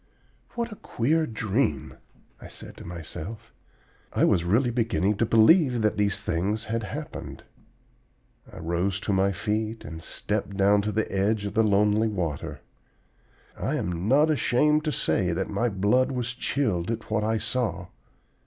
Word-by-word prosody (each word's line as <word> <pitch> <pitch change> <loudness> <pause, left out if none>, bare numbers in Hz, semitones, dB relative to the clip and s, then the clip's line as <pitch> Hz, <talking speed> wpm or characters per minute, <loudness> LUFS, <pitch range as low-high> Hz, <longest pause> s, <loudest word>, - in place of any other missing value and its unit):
"What 235 -1 -2
a 210 - -8
queer 155 +7 0
dream," 110 - -1 0.5
I - - -9
said - - -11
to - - -10
myself. 85 +6 -8 0.6
I - - +3
was 85 - +3
really 115 +8 +2
beginning 115 -4 +1
to 115 - +1
believe 125 - +5
that 105 - +2
these 100 -1 +1
things 100 +5 -1
had 115 +1 -2
happened. 105 - -7 1.1
I - - -12
rose 90 +4 -1
to 100 - -1
my 95 +1 +3
feet 110 +3 -2
and 80 +2 -7
stepped 100 +2 -3
down 100 +1 +4
to 105 +1 -2
the 110 +1 -1
edge 100 +2 +1
of 100 - -4
the 110 - +3
lonely 105 +1 +3
water. 85 -9 -3 0.9
I - - -2
am 90 +2 -2
not 150 +6 +4
ashamed 150 +2 +2
to 155 - +1
say 90 - +1
that 95 +4 -2
my 115 +4 +1
blood 105 +7 +2
was 125 -1 -2
chilled 110 -9 -1
at 115 -1 -4
what 110 -1 +1
I 110 +1 +1
saw. 110 -6 -2
105 Hz, 160 wpm, -26 LUFS, 95-115 Hz, 1.1 s, believe